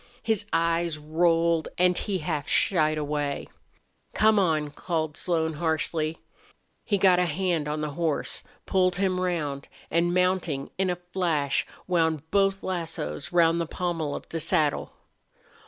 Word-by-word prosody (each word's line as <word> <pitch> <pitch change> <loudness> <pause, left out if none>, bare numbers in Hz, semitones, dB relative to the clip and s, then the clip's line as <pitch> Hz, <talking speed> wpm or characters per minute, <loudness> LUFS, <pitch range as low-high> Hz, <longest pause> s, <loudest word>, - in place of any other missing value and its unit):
His 220 -3 0
eyes 165 0 +1
rolled 165 +1 +2
and 180 0 +4
he 200 0 -2
half 150 -3 -3
shied 155 -4 +3
away. 145 -1 -2 0.7
"Come 215 0 +5
on!" 155 -5 +1
called 160 -1 -2
Slone, 160 -2 0
harshly. 160 0 -1 0.7
He 205 - +1
got 185 -2 +5
a 180 - +3
hand 170 -2 -1
on 150 +1 -2
the 150 -1 -2
horse, 160 0 -1 0.2
pulled 185 -1 +2
him 185 -1 0
round, 150 -6 -2 0.2
and, 170 +1 +2
mounting 180 -6 0
in 190 -1 +2
a 180 - 0
flash, 175 -5 -1 0.2
wound 160 -4 +1
both 195 -1 +2
lassos 165 - -4
round 170 -1 +4
the 165 - -2
pommel 165 -4 -2
of - - -8
the 165 - -3
saddle. 155 -2 +1
165 Hz, 140 wpm, -26 LUFS, 155-180 Hz, 0.7 s, Come